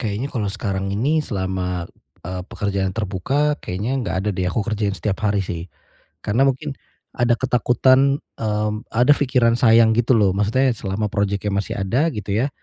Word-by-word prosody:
kayaknya 115 +4 -3
kalau 110 -6 -1
sekarang 100 -1 -3
ini 145 +8 +2
selama 95 - -3 0.4
e 90 +2 -4
pekerjaan 100 -2 -2
terbuka, 115 +9 0
kayaknya 100 +6 -3
enggak 115 - -3
ada - - 0
deh, 90 -1 -1
aku 100 +3 -1
kerjain 105 -3 -1
setiap 100 -1 -2
hari 100 -2 +1
sih. 85 0 -5 0.6
Karena 120 +6 +2
mungkin 140 +2 -2 0.4
ada 120 -1 +2
ketakutan, 130 +2 +3 0.2
mmm, 105 0 -2
ada 120 +5 +4
pikiran 125 -4 +2
sayang 115 -1 +6
gitu 120 +2 +3
loh. 100 -4 +3
Maksudnya 125 +6 +2
selama 100 +1 -2
projeknya 100 0 -1
masih 100 +1 -2
ada, 120 +12 +1
gitu 105 -3 -4
ya. 115 +7 +1
105 Hz, 160 wpm, -21 LUFS, 100-125 Hz, 0.6 s, sayang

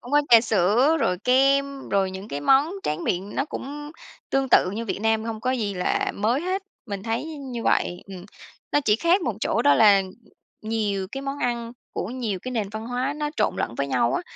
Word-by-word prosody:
cũng 245 +3 -11
có 295 - +6
trà 230 -2 +8
sữa, 225 - +3
rồi 180 -8 +1
kem, 275 +2 +2
rồi 195 -1 +1
những 190 +2 -8
cái 145 - -4
món 270 - +4
tráng 155 +3 -2
miệng 190 +3 -2
nó 275 - 0
cũng 295 0 -7 0.4
tương 270 0 +1
tự 185 - +5
như 225 +3 -4
Việt 200 - -3
Nam, 220 0 +1
hông 225 -1 -4
có 255 - 0
gì 220 -6 -1
là 180 0 0
mới 230 +7 +1
hết, 375 +2 -2 0.2
mình 200 -3 -5
thấy 225 +5 -2
như 275 -7 -6
vậy. 175 - +1
Ừm, 185 -2 -9 0.5
nó 290 - +4
chỉ 215 -6 +2
khác 345 - +3
một 240 - -1
chỗ - - 0
đó 145 - +5
là 200 +2 +6 0.6
nhiều 210 -3 -1
cái 270 - -5
món 275 +1 -4
ăn 235 -2 -2 0.2
của - - -3
nhiều 230 -5 -3
cái 255 - -5
nền 215 -5 -1
văn 220 +2 -6
hóa 250 +3 -1
nó 300 -1 -2
trộn - - +1
lẫn 115 - -2
với 140 - -1
nhau 120 -3 +1
á, - - -1
230 Hz, 220 wpm, -24 LUFS, 200-270 Hz, 0.6 s, trà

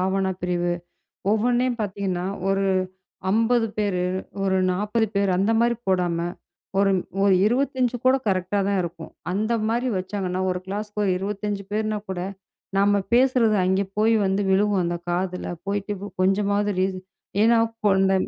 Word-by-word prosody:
வன்னா 195 -1 +1
பிரிவு 175 -1 0 0.6
ஒவ்வொன்னையும் 240 +2 +1
பாத்தீங்கன்னா 190 -3 -2 0.3
ஒரு 195 0 +1 0.7
50 225 +1 +3
பேரு, 200 -4 0 0.4
ஒரு 190 -1 +2
40 210 +4 0
பேரு 200 -1 +2
அந்த 200 +4 +2
மாரி 235 0 +3
போடாம 180 -3 +1 0.6
ஒரு, 200 0 +4 0.3
ஒரு 200 - +5
25 255 +1 +1
கூட 260 +1 +6
கரெக்டா 185 +1 +1
தான் 200 -2 +1
இருக்கும். 170 -1 -7 0.2
அந்த 215 +5 0 0.2
மாரி 240 +3 0
வச்சாங்கன்னா 185 -1 -3
ஒரு 180 - -2
கிளாஸ்க்கு 210 +1 -3
ஒரு 190 - +2
25 200 +1 -3
பேர்னா 215 0 -1
கூட 180 -2 -3 0.6
நம்ம 200 +1 +4
பேசுறது 245 -3 +4
அங்கே 190 +2 +2
போய் 220 +2 +4
வந்து 195 +1 +1
விழுகும், 200 -1 +3
அந்த 175 0 -1
காதுல 180 +1 -2 0.2
போயிட்டு 205 +1 -1 0.3
கொஞ்சமாவது 200 +2 +2
ரீச் 190 0 0 0.4
ஏன்னா 230 +1 +5 0.3
கொண்ட 195 -1 +4
200 Hz, 140 wpm, -24 LUFS, 190-220 Hz, 0.7 s, கூட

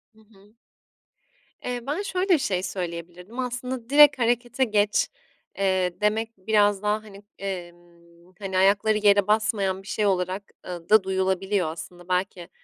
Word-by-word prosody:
Hı - - -22
hı. 210 0 -23 1.1
Eee, 245 0 -2
ben 300 +7 -1
şöyle 385 -1 -2
bir 355 - +6
şey 185 -9 -1
söyleyebilirdim, 180 +3 -6
aslında, 250 -1 -4
"direkt 290 -1 +7
harekete 240 +2 +1
geç" 210 -3 +2 0.5
eee, 190 -2 +1
demek 220 +2 +1
biraz 205 0 +2
daha 210 +1 0
hani, 205 -1 -13
emm, 175 -2 -9
hani, 190 -2 -3
ayakları 205 +3 +3
yere 205 -1 +4
basmayan 210 -3 +1
bir - - -16
şey 210 - -1
olarak, 185 0 0 0.2
ııı, 175 -2 -7
da 215 -1 +6
duyulabiliyor 190 0 0
aslında. 175 +2 -10
Belki, 180 -1 -2
200 Hz, 140 wpm, -25 LUFS, 185-220 Hz, 1.1 s, direkt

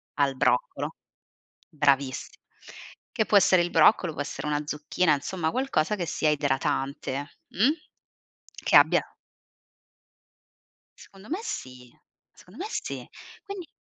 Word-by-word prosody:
al 140 -2 +1
broccolo, - - 0 0.7
bravissimo. 140 -4 0 0.7
Che 220 - +1
può 205 - +1
essere 185 -2 +5
il 175 - -3
broccolo, 160 0 +4
può 145 - -4
essere 145 - -5
una 150 0 0
zucchina, 150 +2 +1
insomma, 160 +3 -2
qualcosa 230 -8 0
che 175 - -2
sia 155 - 0
idratante, 140 -1 -2
mh? 215 +8 +2 1.0
Che - - +2
abbia - - +5 2.0
Secondo 195 +3 -15
me 350 - -2
sì, 125 - -7 0.4
secondo - - -17
me - - -3
sì. - - -4 0.4
Quindi 395 -5 -8
155 Hz, 115 wpm, -26 LUFS, 140-200 Hz, 2.0 s, essere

